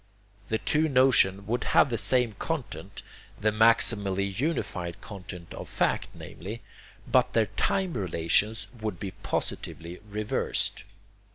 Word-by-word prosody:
The 110 - 0
two 155 +6 +1
notions 120 -8 +4
would 120 +2 -1
have 135 - +6
the - - +1
same 125 -3 +4
content 110 - -5 0.4
the 110 +1 +2
maximally 105 -3 +3
unified 95 - -2
content 90 -4 -9
of - - -8
fact, - - 0
namely 105 +7 -8 0.4
but - - +2
their - - +3
time 190 -3 0
relations 95 +3 +1 0.2
would 105 -6 -3
be 95 - -4
positively 85 0 -4
reversed. 105 -1 -1
105 Hz, 120 wpm, -27 LUFS, 95-120 Hz, 0.4 s, have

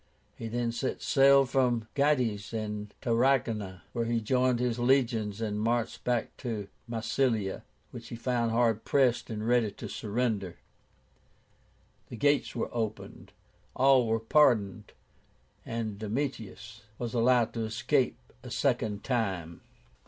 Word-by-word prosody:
He 115 - -6
then 120 +1 -1
set 120 +3 -3
sail 140 0 +5
from 125 -4 +1
Gades 125 -8 +1
to 105 -2 -4 0.2
Tarragóna, 115 -6 +1
where 115 -1 -1
he 115 0 0
joined 125 +2 +1
his 125 -1 -1
legions 120 -5 +1
and 105 -1 -2
marched 115 +1 -1
back 120 -2 -1
to 110 -6 -4 0.2
Massilia, 115 -3 0 0.3
which - - -9
he - - -7
found 120 -1 0
hard 115 -1 +1
pressed 125 -4 +2
and 110 -1 -4
ready 120 -3 +3
to - - -8
surrender. 105 -4 -2 1.5
The 120 - -7
gates 145 +5 +2
were - - -3
opened. 110 -3 -5 0.4
All 130 -2 +5
were 115 0 +1
pardoned, 115 -5 +2 0.7
and 110 -3 -4
Domitius 110 -2 -4 0.2
was 120 -1 -4
allowed 120 -1 +3
to 115 -1 -2
escape 125 +4 0 0.2
a - - -9
second 105 -2 0
time. 95 -10 -2
115 Hz, 130 wpm, -29 LUFS, 110-125 Hz, 1.5 s, sail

